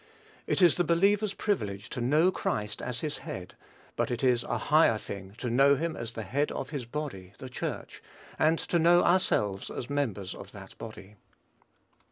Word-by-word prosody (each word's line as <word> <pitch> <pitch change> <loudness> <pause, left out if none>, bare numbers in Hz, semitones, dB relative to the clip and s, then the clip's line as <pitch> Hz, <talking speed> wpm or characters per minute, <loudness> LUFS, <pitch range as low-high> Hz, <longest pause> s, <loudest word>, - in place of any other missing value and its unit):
It 190 - +2
is 175 - +6
the 175 - +3
believer's 195 +5 +2
privilege 105 - -2
to 125 - -4
know 155 +9 +4
Christ 105 - -2
as 120 -1 -3
his 150 -1 -3
head; 90 -1 -7 0.4
but - - 0
it 120 0 -3
is 125 -2 +4
a - - -1
higher 150 -7 +4
thing 100 -1 -8
to 125 - -4
know 140 +3 +5
him 165 +3 -2
as 115 0 -5
the 110 - -5
head 140 +9 0
of - - -5
his 135 -6 -4
body 120 -10 -5
the 130 - -8
Church, 125 - -5 0.4
and 160 +2 +4
to 170 - 0
know 175 +2 +5
ourselves 105 - +2
as 125 +3 -6
members 110 -10 -1
of 100 - -11
that 100 -2 -11
body. 105 -2 -10
125 Hz, 185 wpm, -29 LUFS, 105-160 Hz, 0.4 s, is